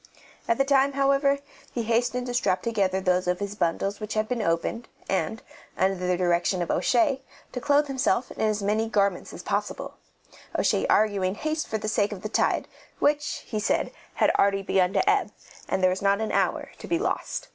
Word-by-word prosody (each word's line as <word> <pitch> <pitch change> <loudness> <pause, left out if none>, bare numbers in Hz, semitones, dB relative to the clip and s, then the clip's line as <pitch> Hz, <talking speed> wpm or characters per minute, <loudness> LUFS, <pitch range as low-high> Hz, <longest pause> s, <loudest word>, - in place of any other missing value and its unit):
At 230 - +2
the 275 - +2
time, 275 0 +3
however, 275 0 +3 0.3
he 235 - -2
hastened 245 +2 0
to 245 - -4
strap 190 -7 +1
together 195 -5 +1
those 185 -1 +1
of 180 0 +1
his 200 0 -3
bundles 195 +2 -1
which 215 0 -5
had 215 0 +1
been 245 -1 -1
opened, 170 +6 -1 0.2
and, 220 +3 -1 0.3
under 190 +1 +3
the 180 -1 +2
direction 175 0 +1
of 170 - -3
O'Shea, 240 +8 +2 0.3
to 250 - -5
clothe 290 +1 +3
himself 260 -2 0
in - - -7
as 215 -1 +1
many 215 +2 +1
garments 200 -4 0
as - - -9
possible, - - -3 0.6
O'Shea - - +2
arguing 200 -3 +2
haste 310 +5 -2
for 220 - -1
the 215 - -5
sake 210 -1 +1
of 200 -3 -7
the 215 - -3
tide, - - +1 0.3
which, 295 0 0
he 215 - -3
said, 210 - 0 0.2
had - - +3
already 195 0 +3
begun 185 -1 +2
to - - +1
ebb, 410 0 +2 0.4
and 190 - 0
there 185 - +5
was 185 - -3
not 200 +1 +3
an 220 - -2
hour - - 0
to - - -8
be 340 - +1
lost. 370 - -3
215 Hz, 200 wpm, -26 LUFS, 190-250 Hz, 0.6 s, there